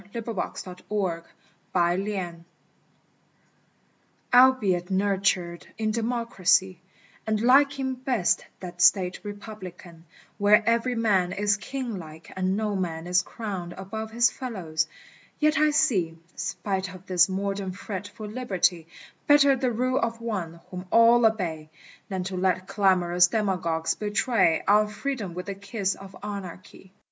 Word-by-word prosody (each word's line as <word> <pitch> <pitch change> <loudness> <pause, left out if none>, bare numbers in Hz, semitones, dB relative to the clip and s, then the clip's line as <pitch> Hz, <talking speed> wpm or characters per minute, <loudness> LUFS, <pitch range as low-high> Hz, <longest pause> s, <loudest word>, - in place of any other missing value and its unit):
LIBERTATIS 230 -3 -4
SACRA 180 -2 -3 0.5
FAMES 175 -1 -1 1.9
ALBEIT 220 -9 +5
nurtured 190 -3 0
in 215 -1 0
democracy, 215 -6 +1 0.5
And 215 -1 +1
liking 270 +2 +3
best 255 -7 0 0.2
that 180 -1 -7
state 180 0 +4
republican 195 -5 -10 0.3
Where 210 +2 +5
every 235 +2 +2
man 200 -6 +2
is 205 +1 +1
Kinglike 200 - -6
and 185 +1 0
no 210 -1 -1
man 165 -3 -3
Is 180 +1 +3
crowned 190 -7 -6
above 220 +4 -6
his 235 +1 +3
fellows, 170 -11 -3 0.5
yet 305 +1 +3
I 305 0 +4
see, 220 - +1 0.2
Spite 190 -2 -3
of 185 0 -14
this 185 0 +4
modern 195 0 -2
fret 195 +1 -6
for 210 +1 -9
Liberty, 190 -8 0 0.4
Better 285 -1 +6
the 255 0 0
rule 255 +3 0
of 230 0 -2
One, 185 -8 -4
whom 180 0 -7
all 230 +1 +6
obey, 165 -8 -3 0.4
Than 190 -2 -2
to 190 +1 -5
let 185 0 0
clamorous 180 -3 +3
demagogues 175 -6 0
betray 205 -4 +1
Our 210 +1 +5
freedom 210 -4 -4
with 180 0 -5
the 200 - -4
kiss 200 0 -2
of 195 0 -12
anarchy. 190 -2 -8
200 Hz, 125 wpm, -26 LUFS, 180-225 Hz, 1.9 s, Better